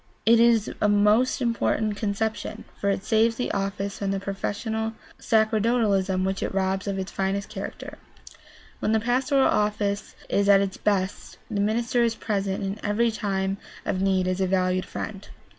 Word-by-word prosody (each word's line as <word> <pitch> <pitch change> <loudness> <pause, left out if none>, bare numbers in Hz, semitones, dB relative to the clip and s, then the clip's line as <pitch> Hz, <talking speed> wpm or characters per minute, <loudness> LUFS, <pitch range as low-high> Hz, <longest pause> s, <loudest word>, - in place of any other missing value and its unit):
It 230 +1 +6
is 230 -2 +4
a 210 - +4
most 210 +6 +3
important 225 -2 0
conception, 215 +1 -3
for 200 - -1
it 195 -1 -1
saves 225 0 +3
the 250 - -2
office 195 0 -3
from 200 - -1
the 195 0 0
professional 220 +3 -3 0.3
sacerdotalism 215 -4 +2
which 190 0 -2
robs 190 0 -1
it - - 0
of - - -4
its 190 0 -4
finest 195 +1 -2
character. - - -7 0.8
When 215 - 0
the 220 - +4
pastoral 260 +4 +2
office 210 -1 0
is 200 0 +1
at 200 -1 +7
its 195 -1 -2
best 195 -2 -1
the 205 -2 0
minister 230 +3 +1
is 230 -1 +2
present 200 -3 -2
in 195 +2 -3
every 225 +3 +2
time 195 -3 -1 0.3
of 185 - -1
need 190 -1 +2
as 185 +1 -1
a 190 - +2
valued 185 0 +1
friend. 200 -2 -6
205 Hz, 165 wpm, -25 LUFS, 195-220 Hz, 0.8 s, at